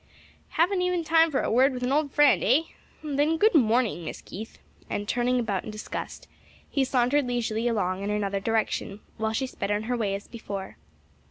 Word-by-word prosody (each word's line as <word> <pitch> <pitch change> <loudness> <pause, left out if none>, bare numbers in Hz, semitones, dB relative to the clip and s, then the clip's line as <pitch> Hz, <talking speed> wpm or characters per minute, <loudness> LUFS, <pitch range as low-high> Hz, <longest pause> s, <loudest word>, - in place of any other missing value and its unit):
"Haven't 360 +4 +3 0.3
time 325 0 +5
even - - -7
for 270 - +1
a - - -1
word 260 +4 +4
with 250 - -5
an 250 - 0
old 290 0 +1
friend, 295 0 +4
eh? 295 - +4 0.4
Then 300 +2 +1
good 435 +6 +4
morning, 230 - +2
Miss 160 - -6
Keith," 220 +4 -9 0.3
and 205 0 -3
turning 245 +2 +1
about 205 -5 -1
in - - -7
disgust, 215 0 -6 0.4
he 275 - +2
sauntered 255 +2 +2
leisurely 235 -1 -1
along 195 -5 0
in 200 - -3
another 200 -1 -1
direction 215 -1 -1 0.2
while 220 0 -1
she 265 +4 0
sped 200 -6 -5
on 205 +1 0
her 245 +3 -1
way 205 -4 -1
as 200 - -8
before. 200 -4 -7
240 Hz, 190 wpm, -26 LUFS, 210-275 Hz, 0.4 s, time